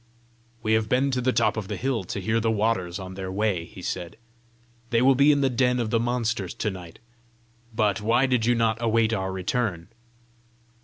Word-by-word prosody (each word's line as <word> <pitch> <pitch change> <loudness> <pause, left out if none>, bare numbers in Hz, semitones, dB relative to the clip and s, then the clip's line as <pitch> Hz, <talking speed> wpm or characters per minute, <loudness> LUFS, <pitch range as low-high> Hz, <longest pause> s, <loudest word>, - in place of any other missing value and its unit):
"We 110 0 +1
have 110 -1 +1
been 135 +2 +2
to 130 -1 0
the 130 +1 +2
top - - +1
of 105 -3 -4
the - - -4
hill 130 -6 -1
to 100 - -4
hear 110 +4 0
the 115 0 0
waters 105 -5 0
on 95 -1 -7
their 95 0 -5
way," 95 -4 -1
he 90 - -12
said. 85 -1 -5 0.7
"They 115 -2 +2
will 135 +3 +5
be 140 +3 +5
in 145 -1 +2
the 135 - +3
den 125 0 +2
of 115 -2 -2
the 115 - +2
monsters 115 -5 -1
to 105 - -2
night. 90 -3 -10 0.7
But 105 -2 0
why 120 +5 +3
did 125 -4 +1
you 120 - +4
not 115 0 +1
await 115 -1 +2
our 95 -3 -2
return?" 95 -1 -2
110 Hz, 205 wpm, -25 LUFS, 95-120 Hz, 0.7 s, will